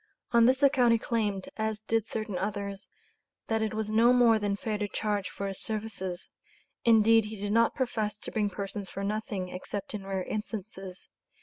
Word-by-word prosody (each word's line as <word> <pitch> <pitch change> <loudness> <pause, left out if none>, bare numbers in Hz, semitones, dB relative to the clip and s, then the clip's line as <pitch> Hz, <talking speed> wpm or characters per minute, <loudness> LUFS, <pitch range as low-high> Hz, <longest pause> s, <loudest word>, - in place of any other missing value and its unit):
On 235 -1 +6
this 260 +2 +3
account 255 -4 +5
he - - +4
claimed, 210 -4 -1
as 220 -1 -2
did 225 0 0
certain 215 -3 -3
others, 200 0 -3 0.6
that 225 -1 +1
it 220 0 -1
was 215 -1 -2
no 230 +3 +5
more 235 -3 +5
than 205 -1 0
fair 210 +1 -3
to 205 - -1
charge 205 -1 -2
for 200 - -5
his 195 -1 -3
services 200 -4 -4 0.6
indeed 225 -1 +6
he 215 -1 -7
did 205 +1 -1
not 230 +1 +4
profess 220 -5 -1
to - - -8
bring 210 -2 +1
persons 200 0 -5
for 195 - -5
nothing, 205 -2 -2
except 185 +3 -5
in 195 -2 -5
rare 190 -1 -1
instances. 195 -3 -6
210 Hz, 185 wpm, -29 LUFS, 200-225 Hz, 0.6 s, On